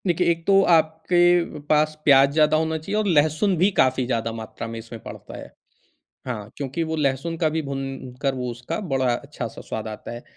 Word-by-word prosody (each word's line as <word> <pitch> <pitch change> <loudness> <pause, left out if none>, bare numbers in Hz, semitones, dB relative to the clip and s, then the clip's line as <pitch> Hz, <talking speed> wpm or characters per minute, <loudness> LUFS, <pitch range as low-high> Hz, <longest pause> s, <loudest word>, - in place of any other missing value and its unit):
देखिए, 175 0 +2
एक 165 0 -4
तो 195 0 +6
आप 160 -1 +5 0.2
के 175 -2 +3
पास 155 0 +3
प्याज 140 -1 +6
ज़्यादा 155 0 +4
होना 160 0 0
चाहिए 180 +7 -5
और 215 - 0
लहसुन 155 +3 +2
भी 185 +5 +4
काफ़ी 130 -1 +3
ज़्यादा 115 -2 -1
मात्रा 115 0 -7
में 115 0 -6
इसमें 115 0 -10
पड़ता - - -9
है। - - -10 0.8
हाँ, 110 -4 -5
क्योंकि 140 +3 -3
वो 160 0 -3
लहसुन 150 +2 -1
का 160 -1 +2
भी 160 +1 -1
भुन 135 -2 -5
कर 135 -1 +1
वो 125 -1 -3
उसका 120 - -5
बड़ा 130 -2 +2
अच्छा-सा 125 -2 -6
स्वाद 110 0 -5
आता 110 -1 -7
है। 120 +1 -8
145 Hz, 205 wpm, -23 LUFS, 125-160 Hz, 0.8 s, तो